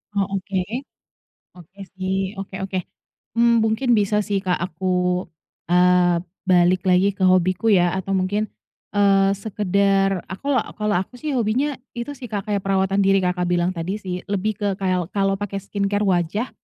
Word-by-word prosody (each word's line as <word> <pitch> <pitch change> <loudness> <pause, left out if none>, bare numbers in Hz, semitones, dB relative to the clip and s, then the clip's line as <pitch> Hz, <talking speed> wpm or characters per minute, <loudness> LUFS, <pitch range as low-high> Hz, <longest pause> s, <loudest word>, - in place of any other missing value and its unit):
Oh, 200 -1 +2 0.2
oke. 190 +1 -4 1.0
Oke 180 +3 -17 0.2
sih. 190 0 -2 0.2
Oke 195 0 -7
oke. 190 -1 -3 0.6
Mmm, 235 0 +5
mungkin 220 +4 0
bisa 210 0 +1
sih, 200 -1 +1
Kak, 180 -1 +1
aku, 175 +1 -8 0.9
eee, 180 -1 +4 0.3
balik 180 0 +4
lagi 185 +2 +3
ke 195 - -4
hobiku 185 +2 +3
ya 185 -4 +5
atau 190 +1 -5
mungkin, 205 +3 -1 0.4
eee, 200 -1 +4 0.2
sekedar 195 -2 +1
aku 190 +9 -9 0.3
kalau 210 -1 0
aku 190 - -8
sih 305 - -2
hobinya 255 +6 0 0.2
itu 235 +3 -5
sih, 250 - -7
Kak, 205 -3 -3
seperti 200 -2 -1
perawatan 195 0 +1
diri 195 0 +4
Kakak 180 0 0
bilang 175 0 +1
tadi 180 +1 -3
sih. 180 -2 -3
Lebih 200 +1 -1
ke 205 - -2
kayal 185 -2 0
kalau 195 -1 +1
pakai 200 -1 -4
skincare 200 0 -1
wajah 190 +5 0
195 Hz, 160 wpm, -22 LUFS, 185-205 Hz, 1.0 s, Mmm